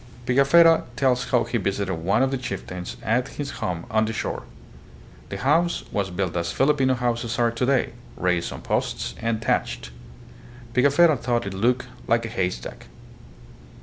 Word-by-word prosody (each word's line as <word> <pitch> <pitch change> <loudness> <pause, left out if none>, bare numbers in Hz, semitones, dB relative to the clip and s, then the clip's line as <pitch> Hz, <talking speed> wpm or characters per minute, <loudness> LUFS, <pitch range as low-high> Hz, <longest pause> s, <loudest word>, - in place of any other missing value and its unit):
Pigafetta 150 +6 +5
tells 130 -2 +2
how 125 - +3
he 120 +1 -2
visited 100 -1 -1
one 90 +9 +1
of 135 - +1
the 135 - 0
chieftains 90 -6 -6
at 125 +4 +1
his 145 -1 -3
home 90 -6 -2
on 110 0 +3
the 110 - -3
shore. - - -3 0.9
The - - -4
house 165 +6 +2
was 100 -2 -1
built 90 -1 -2
as 85 -1 -1
Filipino 135 -2 +2
houses 120 -1 -1
are 120 -1 +2
today, 125 +1 +1 0.2
raised 90 -2 0
on - - -8
posts - - -1
and 115 -1 0
thatched. 60 - -1 0.8
Pigafetta 140 +5 +5
thought 120 -2 -1
it 95 - -4
looked 120 +6 +1
" - - -19
like 115 0 +2
a - - -5
haystack." 90 - -4
120 Hz, 160 wpm, -24 LUFS, 100-130 Hz, 0.9 s, Pigafetta